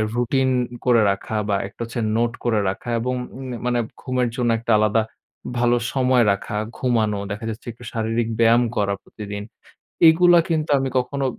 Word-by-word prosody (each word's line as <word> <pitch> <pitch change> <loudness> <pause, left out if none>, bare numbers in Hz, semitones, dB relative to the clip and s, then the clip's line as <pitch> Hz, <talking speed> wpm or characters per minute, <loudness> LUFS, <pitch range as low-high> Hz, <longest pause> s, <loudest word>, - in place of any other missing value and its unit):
Routine 130 +2 +1 0.4
করে 120 -3 +5
রাখা, 100 +3 -4
বা 100 - +2
একটা 100 - -14
হচ্ছে 115 +1 -5 0.2
নোট 120 0 +1
করে 115 -3 +2
রাখা, 95 +5 -6
এবং 125 +2 -1 0.2
উম 135 - -7 0.2
মানে 120 -1 +1 0.2
ঘুমের 125 -2 0
জন্য 120 -1 0
একটা 115 +1 -2
আলাদা 110 +1 +3 0.6
ভালো 120 0 +3 0.2
সময় 130 -2 +3
রাখা, 100 +1 -3 0.2
ঘুমানো, 110 -5 +1
দেখা 110 +3 -5
যাচ্ছে 110 +3 -8
একটু 120 - -16
শারীরিক 115 0 -1
ব্যায়াম 115 +1 +5
করা 100 -1 +1
প্রতিদিন। 105 -1 -7 0.7
এগুলা 175 +2 +6
কিন্তু 155 -1 0
আমি 135 - -1
কখনো 135 +2 -2
120 Hz, 165 wpm, -22 LUFS, 110-125 Hz, 0.7 s, এগুলা